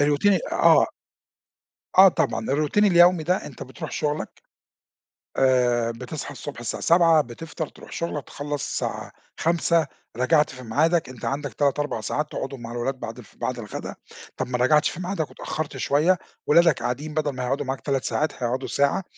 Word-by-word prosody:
الroutine 145 Hz, +4 st, +2 dB
ال 190 Hz, -5 st, +1 dB
آه. -, -, +5 dB, 1.1 s
آه 195 Hz, 0 st, +11 dB
طبعًا، 115 Hz, -9 st, -1 dB
الroutine 150 Hz, +9 st, +2 dB
اليومي 175 Hz, -3 st, +6 dB
ده 180 Hz, +4 st, 0 dB
أنت 135 Hz, -, -9 dB
بترُوح 130 Hz, -, -8 dB
شغلك، 150 Hz, 0 st, -3 dB, 1.0 s
آآ، 125 Hz, -3 st, +3 dB
بتصحى 125 Hz, +5 st, -7 dB
الصبح 145 Hz, -4 st, -8 dB
الساعة 120 Hz, -2 st, -4 dB
07:00 165 Hz, -2 st, +5 dB
بتفطر 150 Hz, +5 st, -6 dB
ترُوح -, -, -15 dB
شغلك، 160 Hz, -4 st, -3 dB
تخلّص 145 Hz, -1 st, -4 dB
الساعة -, -, -3 dB, 0.3 s
17:00 170 Hz, -1 st, +2 dB, 0.3 s
رجَعت 150 Hz, +5 st, +3 dB
في 130 Hz, -1 st, -10 dB
ميعادك، 155 Hz, +6 st, +1 dB
أنت 130 Hz, -3 st, -9 dB
عندك 145 Hz, 0 st, -3 dB
3 145 Hz, 0 st, +1 dB
4 145 Hz, -6 st, -2 dB
ساعات 150 Hz, +7 st, -2 dB
تقْعدهم 135 Hz, -2 st, -5 dB
مع 115 Hz, 0 st, -7 dB
الولاد 120 Hz, +2 st, -3 dB
بعد 115 Hz, -1 st, -6 dB
الف 115 Hz, -, -15 dB
بعد 125 Hz, -1 st, -3 dB
الغدا. 105 Hz, -3 st, -6 dB, 0.4 s
طَب -, -, -2 dB
ما 125 Hz, 0 st, -1 dB
رجَعتش 140 Hz, +5 st, +4 dB
في -, -, -8 dB
ميعادك 180 Hz, -4 st, -2 dB
واتأخرت 155 Hz, -3 st, -5 dB
شوية، 150 Hz, +8 st, +2 dB, 0.3 s
ولادك 165 Hz, 0 st, +5 dB
قاعدين 145 Hz, +5 st, -3 dB
بدَل 155 Hz, -1 st, 0 dB
ما 130 Hz, -, -3 dB
هيقعدوا 135 Hz, +3 st, -1 dB
معاك 130 Hz, 0 st, -3 dB
3 135 Hz, -2 st, -1 dB
ساعات 155 Hz, -, -1 dB
هيقعدوا 125 Hz, +3 st, -1 dB
ساعة، 140 Hz, +6 st, +1 dB
145 Hz, 170 wpm, -24 LUFS, 125-160 Hz, 1.1 s, آه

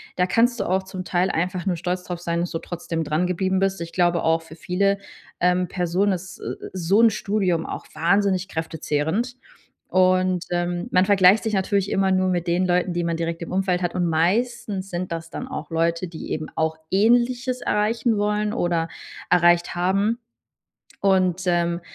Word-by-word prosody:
da 180 Hz, -, +2 dB
kannst 235 Hz, +6 st, +2 dB
du -, -, +1 dB
auch 190 Hz, +1 st, +1 dB
zum 190 Hz, -1 st, -7 dB
Teil 180 Hz, +1 st, +1 dB
einfach 180 Hz, 0 st, -2 dB
nur 180 Hz, -, +1 dB
stolz 180 Hz, +2 st, -3 dB
drauf 175 Hz, -1 st, -5 dB
sein, 170 Hz, -1 st, -1 dB
dass 175 Hz, 0 st, -2 dB
du 165 Hz, -, -2 dB
trotzdem 165 Hz, -1 st, -4 dB
dran 155 Hz, +4 st, 0 dB
geblieben 190 Hz, +1 st, 0 dB
bist. 195 Hz, -1 st, 0 dB
Ich 170 Hz, 0 st, -5 dB
glaube 175 Hz, -1 st, +2 dB
auch 165 Hz, 0 st, +2 dB
für 160 Hz, -1 st, -13 dB
viele, 195 Hz, +4 st, 0 dB, 0.4 s
ähm, 180 Hz, +1 st, +2 dB
Personen 180 Hz, +3 st, 0 dB
ist 190 Hz, +1 st, -7 dB
s -, -, -5 dB, 0.2 s
so 185 Hz, +4 st, +2 dB
'n 230 Hz, -1 st, +6 dB
Studium 195 Hz, -5 st, 0 dB
auch -, -, -6 dB
wahnsinnig 190 Hz, +3 st, +1 dB
kräftezehrend. 160 Hz, -, -2 dB, 0.5 s
Und, 185 Hz, -1 st, +2 dB
ähm, 175 Hz, 0 st, -1 dB
man 185 Hz, 0 st, +4 dB
vergleicht 200 Hz, +2 st, +5 dB
sich 220 Hz, -, -1 dB
natürlich 195 Hz, 0 st, 0 dB
immer 195 Hz, 0 st, +2 dB
nur 185 Hz, 0 st, +2 dB
mit 175 Hz, -2 st, -1 dB
den 180 Hz, +2 st, +2 dB
Leuten, 180 Hz, 0 st, +1 dB
die 175 Hz, 0 st, -1 dB
man 170 Hz, -1 st, -1 dB
direkt 165 Hz, 0 st, -3 dB
im 170 Hz, -, -6 dB
Umfeld 185 Hz, -1 st, 0 dB
hat, 175 Hz, -, -1 dB
und 180 Hz, -, 0 dB
meistens 195 Hz, +3 st, 0 dB
sind 175 Hz, 0 st, -4 dB
das 165 Hz, 0 st, -5 dB
dann 255 Hz, -, -6 dB
auch 260 Hz, -, -6 dB
Leute, 165 Hz, +2 st, 0 dB
die 165 Hz, -, -7 dB
eben 155 Hz, -, -3 dB
auch 160 Hz, 0 st, 0 dB
ähnliches 245 Hz, +4 st, +2 dB
erreichen 220 Hz, +1 st, +1 dB
wollen 210 Hz, 0 st, 0 dB
oder 175 Hz, -7 st, 0 dB, 0.4 s
erreicht 175 Hz, 0 st, +4 dB
haben. 195 Hz, +6 st, +1 dB, 0.8 s
Und, 185 Hz, -2 st, +2 dB
ähm 170 Hz, -1 st, +1 dB
180 Hz, 185 wpm, -23 LUFS, 170-195 Hz, 0.8 s, n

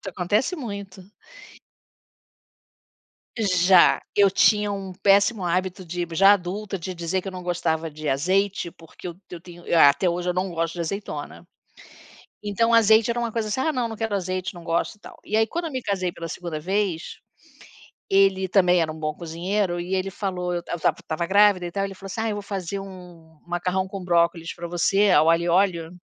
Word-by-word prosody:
Isso 195 Hz, -, -7 dB
acontece 210 Hz, -, 0 dB
muito. 200 Hz, -7 st, -7 dB, 2.4 s
Já. 185 Hz, -3 st, +4 dB
Eu 200 Hz, -1 st, +5 dB
tinha 210 Hz, +1 st, +3 dB
um 195 Hz, -1 st, -5 dB
péssimo 200 Hz, +2 st, +3 dB
hábito 185 Hz, +2 st, -2 dB
de 175 Hz, +1 st, -3 dB
já 195 Hz, +4 st, +7 dB
adulta, 195 Hz, +2 st, -3 dB
de 185 Hz, +2 st, -5 dB
dizer 175 Hz, +2 st, -2 dB
que 195 Hz, -, -9 dB
eu -, -, -4 dB
não 180 Hz, -1 st, -8 dB
gostava 165 Hz, -2 st, -1 dB
de 155 Hz, 0 st, -5 dB
azeite, 185 Hz, +5 st, 0 dB
porque 165 Hz, +2 st, -12 dB
eu 170 Hz, -, -7 dB
eu 175 Hz, -, -8 dB
tenho 175 Hz, 0 st, -14 dB
até 145 Hz, +4 st, +5 dB
hoje 175 Hz, +1 st, -3 dB
eu -, -, 0 dB
não 185 Hz, +1 st, -1 dB
gosto 165 Hz, 0 st, -2 dB
de 175 Hz, -, -8 dB
azeitona. 195 Hz, +5 st, -6 dB, 1.0 s
Então 230 Hz, +3 st, +1 dB
azeite 220 Hz, 0 st, +5 dB
era 235 Hz, +1 st, 0 dB
uma 235 Hz, -1 st, -2 dB
coisa, 225 Hz, -1 st, -2 dB
assim 235 Hz, +5 st, -1 dB
"Ah, 315 Hz, -, +1 dB
não. 245 Hz, -2 st, -1 dB
Não 225 Hz, -, -7 dB
quero 220 Hz, -1 st, -3 dB
azeite, 185 Hz, 0 st, -3 dB
não 175 Hz, -2 st, -11 dB
gosto 170 Hz, +5 st, -1 dB
e -, -, -33 dB
tal" -, -, -13 dB
e 215 Hz, -, -2 dB
aí 220 Hz, 0 st, +3 dB
quando 340 Hz, +6 st, -4 dB
eu 315 Hz, -, -4 dB
me 260 Hz, -1 st, -3 dB
casei 185 Hz, -4 st, -2 dB
pela 165 Hz, 0 st, -7 dB
2º 165 Hz, -2 st, -5 dB
vez, 185 Hz, -1 st, -2 dB, 0.9 s
ele 195 Hz, -1 st, +3 dB
também 180 Hz, -2 st, +4 dB
era 155 Hz, -1 st, -1 dB
um 155 Hz, -, -9 dB
bom 155 Hz, -1 st, -2 dB
cozinheiro 175 Hz, +2 st, -2 dB
e 185 Hz, +2 st, -2 dB
ele 190 Hz, +1 st, -1 dB
falou 180 Hz, -3 st, -3 dB
eu 175 Hz, -1 st, -3 dB
ta -, -, -10 dB
eu -, -, -2 dB
estava -, -, +1 dB
estava 165 Hz, +2 st, -3 dB
grávida 200 Hz, -1 st, +4 dB
e 175 Hz, -, -5 dB
tal, 195 Hz, +1 st, -2 dB
ele 195 Hz, 0 st, -4 dB
falou 195 Hz, +1 st, -10 dB
assim: 220 Hz, +4 st, -4 dB
"Ah, 225 Hz, -, -1 dB
eu 210 Hz, -, -2 dB
vou 205 Hz, -, -4 dB
fazer 195 Hz, -1 st, -4 dB
um 195 Hz, -, -7 dB, 0.6 s
um -, -, -32 dB
macarrão 180 Hz, +2 st, -1 dB
com 195 Hz, -1 st, -7 dB
brócolis 170 Hz, -1 st, +1 dB
pra 170 Hz, 0 st, -6 dB
você, 195 Hz, +4 st, +2 dB
ao 155 Hz, 0 st, +5 dB
alho 165 Hz, +1 st, +3 dB
e 175 Hz, -, -1 dB
óleo" 175 Hz, -2 st, +1 dB
185 Hz, 205 wpm, -24 LUFS, 170-200 Hz, 2.4 s, já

